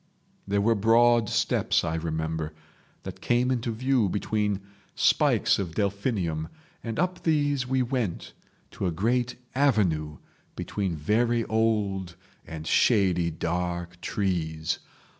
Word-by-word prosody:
There 100 Hz, 0 st, +1 dB
were 115 Hz, +3 st, +3 dB
broad 115 Hz, +1 st, +4 dB
steps, -, -, +1 dB
I 80 Hz, -1 st, -1 dB
remember, 80 Hz, -1 st, -3 dB, 0.5 s
that -, -, -8 dB
came 125 Hz, +1 st, +2 dB
into 120 Hz, -2 st, -1 dB
view 120 Hz, -2 st, +1 dB
between 105 Hz, 0 st, -1 dB, 0.3 s
spikes -, -, +3 dB
of 85 Hz, -5 st, -4 dB
delphinium, 100 Hz, -6 st, -1 dB, 0.4 s
and 115 Hz, -1 st, -4 dB
up 180 Hz, +1 st, -1 dB
these 145 Hz, -5 st, +1 dB
we 130 Hz, 0 st, +1 dB
went 120 Hz, -8 st, -3 dB, 0.4 s
to 95 Hz, -, -3 dB
a -, -, 0 dB
great 120 Hz, +7 st, 0 dB, 0.2 s
avenue 95 Hz, -, +1 dB, 0.4 s
between 95 Hz, -5 st, -3 dB
very 115 Hz, +9 st, +1 dB
old 105 Hz, -5 st, 0 dB, 0.3 s
and 80 Hz, -1 st, -7 dB
shady 90 Hz, -5 st, +3 dB
dark 85 Hz, +1 st, -3 dB
trees. 80 Hz, -5 st, -1 dB
100 Hz, 120 wpm, -27 LUFS, 85-120 Hz, 0.5 s, broad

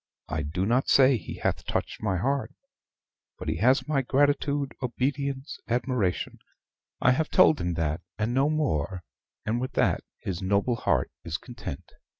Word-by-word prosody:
I 80 Hz, +1 st, -2 dB
do 80 Hz, +6 st, -2 dB
not 120 Hz, +5 st, +2 dB
say 135 Hz, 0 st, +6 dB
he 90 Hz, -9 st, -6 dB
hath -, -, -1 dB
touched -, -, -3 dB
my 100 Hz, -4 st, 0 dB
heart; 130 Hz, +4 st, 0 dB, 0.9 s
but -, -, -7 dB
he 80 Hz, -, -1 dB
has 130 Hz, -, +3 dB
my 145 Hz, -3 st, +2 dB
gratitude, 140 Hz, +1 st, +1 dB
obedience, 135 Hz, +3 st, -2 dB
admiration 115 Hz, -, -1 dB, 0.6 s
I 130 Hz, -, +5 dB
have 155 Hz, +5 st, +1 dB
told 185 Hz, -4 st, +5 dB
him 85 Hz, -1 st, -1 dB
that, 80 Hz, 0 st, -1 dB, 0.2 s
and 110 Hz, +2 st, 0 dB
no 135 Hz, +3 st, +3 dB
more; 95 Hz, -, -1 dB, 0.4 s
and 115 Hz, +2 st, 0 dB
with 130 Hz, +1 st, -3 dB
that -, -, +2 dB, 0.2 s
his 90 Hz, -3 st, -4 dB
noble 100 Hz, +5 st, +1 dB
heart -, -, +1 dB
is -, -, -3 dB
content. -, -, -8 dB
125 Hz, 155 wpm, -27 LUFS, 95-140 Hz, 0.9 s, say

